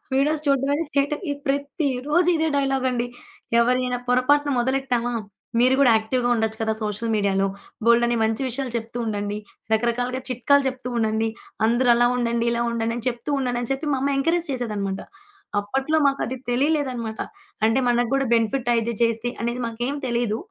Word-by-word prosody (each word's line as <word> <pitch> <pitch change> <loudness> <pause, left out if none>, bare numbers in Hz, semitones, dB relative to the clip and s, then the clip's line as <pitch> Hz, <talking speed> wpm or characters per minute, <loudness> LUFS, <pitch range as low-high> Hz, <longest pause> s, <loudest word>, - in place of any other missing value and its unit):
Videos 300 +3 +2
చూడ్డం 275 0 +2
అనే 330 +3 -1
state 280 +1 +1 0.3
ప్రతి 280 +2 0 0.2
రోజు 345 +3 +3
ఇదే 320 0 +1
డైలాగం‌డి. 260 -3 0 0.5
ఎవరైనా 250 +1 +1
పొరపాటున 285 +3 +3
మొదలెట్టామా! 250 -2 0 0.5
"మీరు 255 +2 +4
గూడా 250 -4 +6
యాక్టివ్‌గా 245 +3 0
ఉండొచ్చు 220 -1 -1
కదా 220 0 +1
సోషల్ 215 +2 -2
మీడియాలో. 195 -1 +1 0.4
బోల్డన్ని 235 0 +4
మంచి 225 +4 0
విషయాలు 255 0 -3
చెప్తూ 230 +2 -7
ఉండండి, 205 -1 -2 0.4
రకరకాలగా 245 +3 0
చిట్కాలు 280 +3 +3
చెప్తూ 255 -1 -6
ఉండండి. 220 0 +1 0.4
అందరూ 240 +2 +3
అలా 240 0 +4
ఉండండి, 235 -1 0
ఇలా 235 0 0
ఉండండి" 230 0 -1
అని 240 - -8
చెప్తూ 240 +4 -6
ఉండండని 245 -1 -2
చెప్పి 285 +3 -3
మా 265 - 0
అమ్మ 280 0 +1
ఎంకరేజ్ 330 +3 +1
చేసేదన్నమాట. 210 -6 -3 0.6
అప్పట్లో 270 +9 0
మాకది 275 -2 +1
తెలియలేదన్నమాట. 250 -4 0 0.4
అంటే 225 +4 +3
మనగ్గూడా 245 +3 +2
బెనిఫిట్ 235 +2 +1
అయితే 230 0 0
చేస్తే 230 0 +1
అనేది 235 +2 -2
మాకేం 240 +4 -3
తెలీదు. 235 -3 0
245 Hz, 150 wpm, -23 LUFS, 230-270 Hz, 0.6 s, గూడా